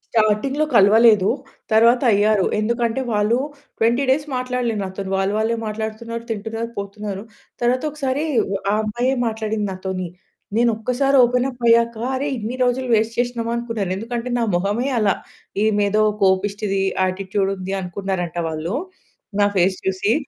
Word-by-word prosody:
చాటింగ్‌లో 225 +7 +2
కలవలేదు. 210 0 +6 0.4
తరువాత 230 +3 +5
అయ్యారు. 205 -1 +3
ఎందుకంటే 235 +3 0
వాళ్ళు 210 +3 +2 0.4
20 235 +4 +2
డేస్ 285 +3 +2
మాట్లాడలే 250 -2 -1
నాతోని. 190 0 -5
వాళ్ళు 195 +1 0
వాళ్ళే 225 +1 +1
మాట్లాడుతున్నారు, 220 +2 -4
తింటున్నారు, 225 +2 -4
పోతున్నారు. 200 0 -5 0.4
తరువాత 245 +1 +1
ఒకసారి 280 -1 -2 0.3
వ - - 0 0.2
ఆ - - +2
అమ్మాయే 240 +5 0
మాట్లాడింది 220 -1 -2
నాతోని. 185 -1 -4 0.5
నేనొక్కసారి 240 +4 +1
ఓపెన్ 250 +1 +2
అప్ 245 -2 -11
అయ్యాక, 235 0 +4 0.2
అరే! 275 +3 -1
ఇన్ని 225 +2 -4
రోజులు 250 +1 0
వేస్ట్ 225 +1 0
చేసినమా, 240 -1 -1
అనుకున్నారు. 230 -5 -3
ఎందుకంటే 235 +4 -4
నా 235 - +1
మొహమే 205 +8 0
అలా, 205 -3 +3 0.5
ఈమేదో 210 -1 +2 0.2
కోపిష్టిది, 195 +1 +1 0.2
యాటిట్యూడుంది 190 0 -1
అనుకున్నారంట 180 -2 -3
వాళ్ళు. 160 +4 -3 0.6
నా 205 - +5
ఫేస్ 185 +1 +3
చూసి. 190 +3 +1
220 Hz, 130 wpm, -21 LUFS, 200-240 Hz, 0.6 s, కలవలేదు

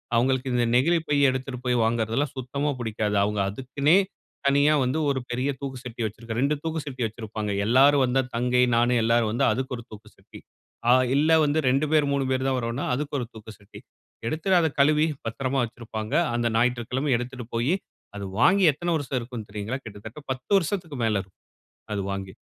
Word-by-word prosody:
அவங்களுக்கு 130 +2 +1
இந்த 120 - +2
நெகிழிப்பை 155 +2 +2
எடுத்துட்டு 130 0 -4
போய் 125 0 +2
வாங்கறதுலாம் 115 +5 0
சுத்தமா 140 +3 -2
புடிக்காது. 110 -2 -2
அவங்க 105 0 -1
அதுக்குன்னே 140 - +2 0.5
தனியா 140 +2 +4
வந்து 130 +4 0
ஒரு 135 -1 0
பெரிய 125 +3 -1
தூக்கு 135 -2 -5
சட்டி 120 -2 -7
வச்சுருக்க 110 +1 -6
2 140 +4 +2
தூக்கு 160 0 -2
சட்டி 130 -3 -4
வச்சுருப்பாங்க. 110 -1 -5
எல்லாரும் 135 +4 +5
வந்தா 130 +1 +2
தங்கை, 125 +1 +2
நானு 120 +1 +3
எல்லாரும் 115 -1 +2
வந்தா 120 - +1
அதுக்கு 130 +2 -3
ஒரு 120 - -9
தூக்கு 110 0 -12
சட்டி. - - -14 0.5
ஆ, - - +7 0.2
இல்ல 155 +3 +3
வந்து 150 +2 +1
2 135 +4 +2
பேர் 150 -2 +3
3 140 -1 +1
பேர் 130 +1 0
தான் 130 -1 +1
வறோன்னா 115 +3 -3
அதுக்கு 145 +2 -4
ஒரு 120 - -4
தூக்கு 110 0 -11
சட்டி 100 - -14 0.5
எடுத்துட்டு 180 +8 +1
அத 160 - +2
கழுவி 150 +2 +4 0.2
பத்தரமா 130 +4 -2
வச்சுருப்பாங்க. 110 -2 -6 0.2
அந்த 120 0 +1
ஞாயிற்றுக்கிழமை 125 +4 0
எடுத்துட்டு 125 0 -6
போய் 120 +8 +1 0.4
அது 100 - -5 0.2
வாங்கி 195 +7 +5
எத்தன 175 +4 -2
வருஷம் 140 -4 -2
இருக்கும் 120 -2 -7
தெரியுங்களா? 105 +5 -4
கிட்டத்தட்ட 105 +4 -9
10 130 +7 -6
வருசத்துக்கு 170 -4 -2
மேல 110 -2 +1
இருக்கும் 95 -1 -19 0.5
அது 100 - -1
வாங்கி. 95 -1 -5
125 Hz, 175 wpm, -25 LUFS, 115-140 Hz, 0.5 s, ஆ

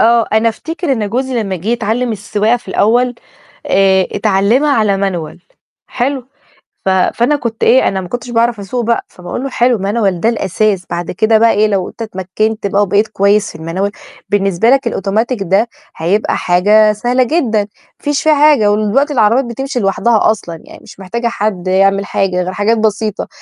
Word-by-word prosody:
آه، 230 0 +4
أنا 220 +1 +3
أفتكر 325 +6 -3
إن 220 -5 -1
جوزي 250 +1 -1
لمّا 195 -3 -3
جِه 180 +6 -7
يتعلِّم 235 +1 -1
السواقة 210 +3 0
في 240 - -15
الأول، 240 +5 +2 0.5
آآ، 190 -1 +3
اتعلِّمها 215 +8 +2
على 210 -6 +1
Manual 165 -4 -6 0.5
حلو، 260 0 -3 0.6
ف 190 - +3
فأنا 235 +9 +1
كنت 235 -5 -5
إيه، 260 +2 +4
أنا 190 - -2
ما 180 - -8
كنتش 245 0 -5
باعرف 235 -2 +1
أسوق 235 +5 -3
بقى، 235 +1 0
فباقول 180 +7 -7
له: 275 - -3
"حلو، 245 -2 +2
Manual 200 0 0
ده 225 - +2
الأساس، 205 -3 0
بعد 175 0 -3
كده 220 +4 +2
بقى 230 +1 +4
إيه، 210 +1 +2
لو 195 -3 -1
أنت - - -9
اتمكّنت 215 +1 -3
بقى 200 +1 +1
وبقيت 205 +2 +1
كويس 205 +1 +1
في - - -15
الManual، 180 +5 -2 0.4
بالنسبة 195 +2 +2
لك 270 -1 +2
الأوتوماتيك 220 +3 -1
ده 195 +5 +1 0.3
هيبقى 185 +7 0
حاجة 210 +4 +3
سهلة 245 +4 0
جدًا، 245 -7 0
ما 205 - -3 0.3
فيش 290 -1 -1
في 315 - +3
حاجة 285 -8 +4
ودلوقتي 215 +8 +1
العربيات 235 +1 +3
بتمشي 255 +2 -4
لوحدها 215 +3 +2
أصلًا 170 -6 -8
يعني - - -14
مش - - -15
محتاجة 235 +6 -4
حد 200 -5 -3
يعمل 195 +1 +2
حاجة 190 -2 -1
غير 185 +1 -4
حاجات 220 +4 +1
بسيطة." 215 -1 -1
215 Hz, 180 wpm, -14 LUFS, 195-240 Hz, 0.6 s, آه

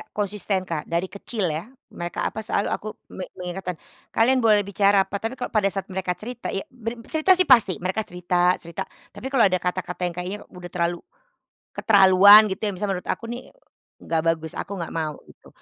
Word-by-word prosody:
konsisten, 205 -1 -1
Kak. 160 -3 -3
Dari 170 +2 -1
kecil 200 -2 -3
ya, 155 +2 -3 0.3
mereka 175 0 -3
apa 220 0 -7
selalu, 200 - 0
aku 215 - -3 0.2
me 185 - -6
me - - -76
mengingatkan, 180 -1 -5 0.4
kalian 255 +4 +4
boleh 215 -2 +5
bicara 200 0 +3
apa, 200 - -3
tapi 225 +4 -4
kalau - - -2
pada 215 -3 +2
saat 195 0 -4
mereka 185 -1 -2
cerita 240 +5 -6
ya 195 - -2
ber 230 -1 -6
cerita 320 +4 +4
sih 370 0 +3
pasti, 230 -8 +5
mereka 185 +5 -2
cerita 180 0 +1
cerita. 170 -1 -5 0.3
Tapi 205 +6 -9
kalau 260 -4 +5
ada 185 - +1
kata-kata 180 0 -3
yang 175 - -4
kayaknya 180 +4 -4
udah 180 -1 -9
terlalu 175 0 -1 0.8
keterlaluan 200 0 +8
gitu, 190 - -5
yang 205 - -1
misalnya 200 +2 -2
menurut - - -13
aku - - -11
nih 240 +1 -5 0.6
nggak 165 -1 -1
bagus, 160 -1 -8
aku - - -5
nggak 170 -4 -5
mau, 155 -2 -2 0.2
gitu. - - -19
190 Hz, 195 wpm, -24 LUFS, 180-215 Hz, 0.8 s, keterlaluan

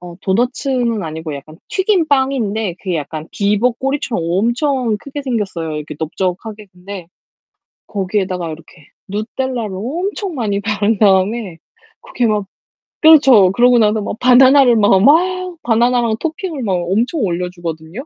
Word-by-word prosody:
어 175 -1 -10
도너츠는 240 +1 -1
아니고 160 -1 -6
약간 155 +3 -11
튀긴 380 -4 +1
빵인데 230 -8 0
그게 185 -4 -2
약간 155 +1 -6
비버 210 +4 +1
꼬리처럼 265 - -2
엄청 235 - 0
크게 285 +3 -7
생겼어요. 195 - -3
이렇게 150 0 -6
넓적하게 190 +6 -4
근데 185 0 -9 0.8
거기에다가 190 -3 -2
이렇게 155 0 -13 0.2
누텔라를 220 0 -3
엄청 350 - -4
많이 210 -6 -1
바른 210 +1 0
다음에 195 -1 +1 0.4
그렇게 245 - -2
막 210 -2 0 0.6
그렇죠. 270 - +6
그러고 245 +4 +4
나서 215 0 +2
막 205 - -5
바나나를 255 0 +6
막, 205 -3 +4
막 365 +5 +2
바나나랑 235 -1 +2
토핑을 325 -2 -4
막 205 -6 -1
엄청 200 - -1
올려 180 -3 -1
주거든요. 170 - -7
215 Hz, 325 characters per minute, -17 LUFS, 185-260 Hz, 0.8 s, 그렇죠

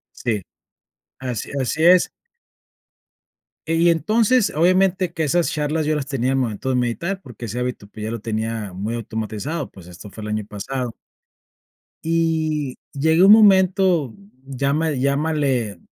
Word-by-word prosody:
Sí. 110 -4 -2 0.8
Así 125 -5 -4
así 145 +5 -1
es. 180 0 +6 1.6
Y 165 +1 +3
entonces, 215 - +2
obviamente, 185 +1 +2
que 160 -2 -2
esas 170 +4 +1
charlas 150 +1 -1
yo 155 - +1
las 145 -3 -2
tenía 130 -3 -1
al 135 - +1
momento 125 0 -2
de 130 - +1
meditar, 170 +11 -1
porque 120 -2 -9
ese 120 +4 -4
hábito, 125 -4 -3
pues, 105 - -11
ya - - -3
lo 115 -3 -5
tenía 110 -2 -3
muy 105 +6 -4
automatizado, 115 +7 -4
pues, 90 -3 -14
esto 90 +4 -11
fue 110 - -11
el 105 - -5
año 105 -1 -2
pasado. 120 +4 -5 1.1
Y 160 -4 0 0.2
llegué 160 +4 +2
a - - +8
un 200 - +8
momento, 190 - +5 0.3
lláma 140 +4 0
llámale, 140 - 0
140 Hz, 145 wpm, -21 LUFS, 115-165 Hz, 1.6 s, a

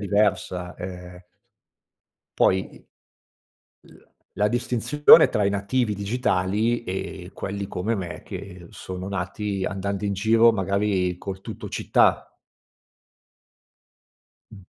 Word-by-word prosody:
diversa, 100 -3 0
ehm 90 -1 -8 1.2
Poi 95 0 +2
i - - -18 1.1
l - - -19 0.3
la 105 0 +2
distinzione 120 +5 +5
tra 105 - 0
i 100 - +2
nativi 105 +3 0
digitali 105 +1 0
e 95 -1 -5
quelli 100 0 -5
come 105 +6 -2
me, 85 -4 -6
che 95 -2 -9
sono 95 +1 -7
nati 95 +1 -3
andando 100 +1 -3
in 100 - 0
giro 115 +3 +4
magari 95 -2 0
col 95 0 -7
TuttoCittà. - - 0 2.2
Mh. 95 -3 -13
100 Hz, 100 wpm, -24 LUFS, 95-105 Hz, 2.2 s, distinzione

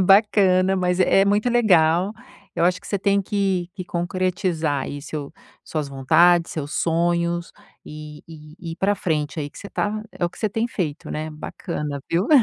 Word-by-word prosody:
bacana, 190 -1 +4
mas 180 -1 0
é 195 +1 +5
muito 205 +4 +2
legal. 185 -5 +4 0.4
Eu - - +2
acho 180 +1 +2
que 200 - -14
você 200 - -1
tem 200 +1 +2
que 190 -3 0
que 185 - -6
concretizar 175 -4 -1
aí 145 0 -6
seu 145 -1 -6 0.3
suas 150 -3 -3
vontades, 170 +6 +4
seus 150 -2 -4
sonhos, 170 +1 0 0.3
eh, 150 0 -9
eh, - - -35
e 160 +2 -9
ir - - -8
para 200 +2 +2
frente 155 -4 -2
aí 145 -1 -4
que - - -13
você - - -8
está, 215 +1 -2
é - - -2
o 175 - 0
que - - -16
você 215 - 0
tem 225 +3 -1
feito, 160 -9 -4
né, 155 +1 -3
bacana, 150 -1 -5
viu? 175 +5 +1
175 Hz, 185 wpm, -22 LUFS, 155-195 Hz, 0.4 s, é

